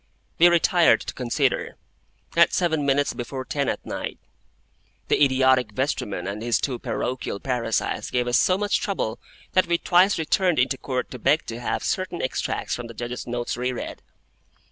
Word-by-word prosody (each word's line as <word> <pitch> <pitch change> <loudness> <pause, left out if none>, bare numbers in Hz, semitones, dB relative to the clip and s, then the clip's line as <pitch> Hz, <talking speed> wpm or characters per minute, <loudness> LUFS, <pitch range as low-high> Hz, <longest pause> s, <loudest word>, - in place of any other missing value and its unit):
We 170 - +8
retired 170 -1 +4
to - - -6
consider, 485 -1 -1 0.6
at - - +5
seven 160 -5 +1
minutes 140 +1 +2
before 130 +2 -5
ten 140 -1 -1
at - - -4
night. - - -5 0.9
The - - +4
idiotic 130 -4 +3
vestryman 105 -7 -2
and 100 +2 -4
his 120 0 +1
two 125 -4 -2
parochial 125 -5 -3
parasites 120 -3 -1
gave 125 -1 0
us 120 - +3
so 185 - +3
much 205 0 +1
trouble 190 - -2 0.3
that 185 - +3
we 170 0 +2
twice 185 +3 +4
returned 175 +2 +1
into 130 +1 +1
Court 130 -2 -3
to 125 - -7
beg 145 +7 +2
to 115 +1 -6
have 120 - -2
certain 185 -2 -2
extracts 130 - -2
from 120 -1 -4
the 115 - -11
Judge's 120 +2 -5
notes 120 0 -2
re 125 +1 -1
read. 125 - -6
130 Hz, 170 wpm, -24 LUFS, 120-170 Hz, 0.9 s, We